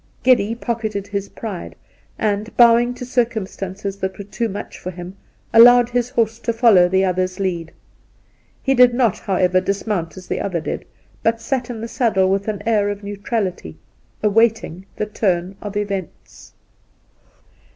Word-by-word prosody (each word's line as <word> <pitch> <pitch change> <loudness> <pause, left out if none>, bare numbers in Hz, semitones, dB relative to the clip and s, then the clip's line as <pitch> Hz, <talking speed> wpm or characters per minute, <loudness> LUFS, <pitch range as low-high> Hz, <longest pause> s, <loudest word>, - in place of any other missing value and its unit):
Geddy 230 -4 +3
pocketed 220 -4 -3
his 200 -1 -4
pride 205 -6 -7 0.4
and, 210 +1 -2
bowing 240 +1 +5
to 250 - -7
circum 235 -4 0
stances 195 +1 -6
that 190 -1 -4
were 200 - -6
too 225 +3 -3
much 200 - -7
for 185 - -6
him, 180 +1 -8 0.4
allowed 245 +1 +8
his 245 0 -1
horse 225 -2 0
to 235 - -1
follow 225 -6 +5
the 190 +1 +2
other's 185 0 -1
lead. 170 -4 -2 0.9
He 270 - +2
did 250 -2 +5
not, 240 -6 +2
how 195 - -2
ever, 185 0 +3
dismount 190 -4 -2
as 185 - -10
the - - -3
other 185 -4 -2
did, 155 - -5 0.4
but 225 0 +1
sat 245 +1 -2
in 230 -2 -6
the 230 - -4
saddle 225 -6 +1
with 195 +1 -1
an 210 -2 -3
air 210 -3 +2
of 205 0 -5
neutrality, 200 - -4 0.5
awaiting 210 -4 +1
the 210 - -2
turn 190 -3 -1
of 205 -1 -5
events. 200 -4 -6
205 Hz, 160 wpm, -20 LUFS, 190-230 Hz, 0.9 s, allowed